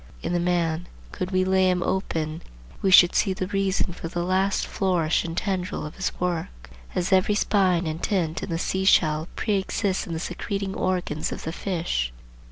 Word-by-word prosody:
In - - -2
the 175 - +2
man, 175 -1 0 0.2
could 180 - -4
we 185 -1 +1
lay 190 0 +3
him 180 -1 +1
open, 165 -4 -2 0.4
we 195 - +2
should 180 -1 +8
see 195 - +2
the 185 - -3
reason 195 -2 0
for 165 - -6
the 175 +1 -3
last 190 +2 +1
flourish 175 -5 +1
and 165 0 -5
tendril 185 -5 -2
of 150 - -7
his 190 - -1
work; 160 - -3 0.2
as 180 +2 0
every 190 +2 +4
spine 185 -4 +2
and 160 +1 -3
tint 170 -6 0
in - - -5
the 165 - -1
sea 190 +2 -1
shell 155 -4 +4
preexists 200 -1 -1
in 170 - -4
the 160 - -2
secreting 195 +2 -3
organs 180 -6 -1
of - - -6
the 160 - -3
fish. 165 - -2
180 Hz, 185 wpm, -25 LUFS, 165-190 Hz, 0.4 s, should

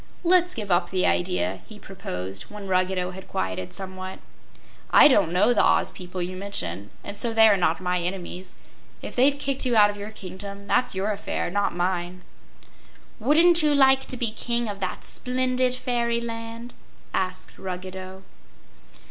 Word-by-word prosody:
"Let's 360 0 +4
give 210 -4 -4
up 175 +1 +2
the 185 -1 +1
idea," 90 +2 0
he 215 - -11
proposed, 95 - -7
when 210 -1 -8
Ruggedo 185 -1 0
had 190 +1 -10
quieted 95 0 -3
somewhat. 185 -1 -7 0.7
"I - - +8
don't 205 - +3
know 205 +7 +4
the 215 - +3
Oz - - +3
people 180 -1 -6
you 185 +1 -5
mention 100 - -4
and 200 - -6
so 225 +2 -1
they 225 0 +8
are 210 - +5
not 175 -3 +1
my 180 -1 -1
enemies. 180 +1 -5 0.5
If - - -7
they've 275 +3 +4
kicked 275 -1 -2
you 250 -3 +1
out 205 -1 +6
of 205 - -10
your 205 +1 -6
kingdom, 200 0 -8
that's 245 +2 +1
your 195 +3 0
affair 200 -3 -3
not 200 -1 0
mine." 180 0 -2 1.0
"Wouldn't 330 +8 +5
you 300 -1 +3
like 265 -1 +5
to 255 - -4
be 235 -3 0
king 235 +1 -1
of 205 -1 -5
that 185 -2 -4
splendid 255 0 0
fairyland?" 235 -1 -3 0.4
asked 185 -1 -2
Ruggedo. 185 0 -7
200 Hz, 165 wpm, -25 LUFS, 180-235 Hz, 1.0 s, I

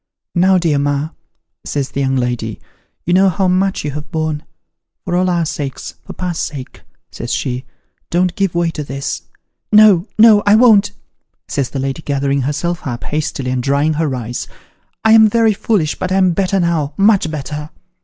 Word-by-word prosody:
'Now, 185 +1 +4
dear 165 -5 +1
ma,' 145 +1 -1 0.5
says 140 -2 -3
the - - -3
young 135 0 +1
lady, 120 -3 -2 0.5
'you 175 - +1
know 190 +1 +5
how 185 +2 0
much 185 -1 0
you 145 - -2
have 150 +1 -7
borne. 155 -2 -2 0.6
For 175 - -1
all 185 +1 +2
our 170 -2 +1
sakes 145 -4 -5
for - - -9
pa's 180 -3 -4
sake,' 135 -4 -6 0.3
says 120 - -6
she, 130 -1 -2 0.2
' - - -49
don't 180 +1 +1
give 195 -4 -1
way 170 -1 +1
to 150 - -5
this! 140 0 -4 0.2
' - - -56
' - - -58
No, 210 -3 +6
no, 215 -1 +7
I 205 - +7
won't! 215 -4 +5 0.3
' - - -53
says 140 -3 -2
the - - -6
lady, 135 +3 -3
gathering 140 -1 -1
herself 150 +5 -2
up, 120 -2 -5
hastily, 145 -4 -3
and 130 -1 -1
drying 140 +4 +1
her 150 -3 -1
eyes; 120 0 -5 0.3
' - - -45
I 220 - +5
am 220 -1 +7
very 225 0 +3
foolish, 195 -6 0
but 185 - -4
I'm 190 -1 +3
better 195 +2 0
now 160 -4 0
much 200 -4 +3
better.' 150 0 -5
160 Hz, 195 wpm, -16 LUFS, 140-190 Hz, 0.6 s, no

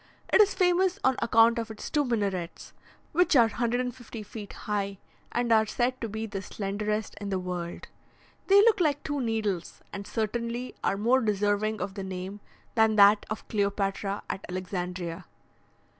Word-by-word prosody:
It - - +8
is 405 -1 +3
famous 365 +1 +3
on 260 0 +4
account 230 +1 +5
of 230 0 -4
its 220 - -7
two 295 -1 +2
minarets, 200 -8 -2 0.4
which 350 0 +3
are 240 -3 +7
150 240 0 -3
feet 210 0 -9
high, 200 -2 -3 0.3
and 240 -1 0
are 220 -1 +5
said 250 +3 -1
to 230 - -3
be 220 +2 -4
the 200 -3 -5
slenderest 210 +2 -3
in 200 - -4
the 190 - 0
world. 180 -2 -5 0.6
They 395 +1 +7
look 435 -1 +4
like 295 -4 +1
two 290 -2 -2
needles, 215 -7 -2
and 200 0 -6
certainly 235 +3 -2
are 195 - +1
more 240 +6 +3
deserving 210 0 0
of 195 - -3
the 195 -1 -5
name 190 +2 -6 0.3
than 220 -1 +4
that 205 0 +6
of 215 - -5
Cleopatra 200 -1 -1
at 190 - -4
Alexandria. 180 -1 -4
215 Hz, 160 wpm, -28 LUFS, 195-240 Hz, 0.6 s, It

